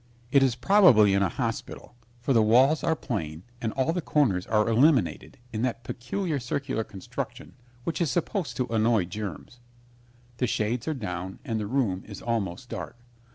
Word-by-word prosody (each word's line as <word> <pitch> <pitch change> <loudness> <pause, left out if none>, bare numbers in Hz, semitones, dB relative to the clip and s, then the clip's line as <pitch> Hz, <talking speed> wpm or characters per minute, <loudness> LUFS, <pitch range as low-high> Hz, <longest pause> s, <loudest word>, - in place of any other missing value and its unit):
It 140 - +6
is 130 -3 +3
probably 125 - +6
in 100 - +3
a 100 - +2
hospital, 115 +3 -4 0.3
for 130 +3 0
the 115 - +5
walls 130 +8 +4
are 160 - +2
plain 85 - -4 0.2
and 115 - -1
all 135 +5 +1
the 180 - -1
corners 115 - +1
are 105 -1 +2
eliminated 125 - +2 0.2
in 110 - -2
that 120 -1 -2
peculiar 145 - -3
circular 130 -1 -2
construction 100 -3 -7 0.3
which 170 +4 -2
is 165 - +2
supposed 175 +2 -2
to 125 - +1
annoy 110 -3 +2
germs. 105 +4 -7 0.8
The 125 - +1
shades 110 +4 -1
are 155 - 0
down 95 -5 -5
and 115 -5 -1
the 105 - -3
room 110 -7 0
is 105 - -8
almost 115 -1 -3
dark. - - -6
115 Hz, 170 wpm, -27 LUFS, 105-135 Hz, 0.8 s, It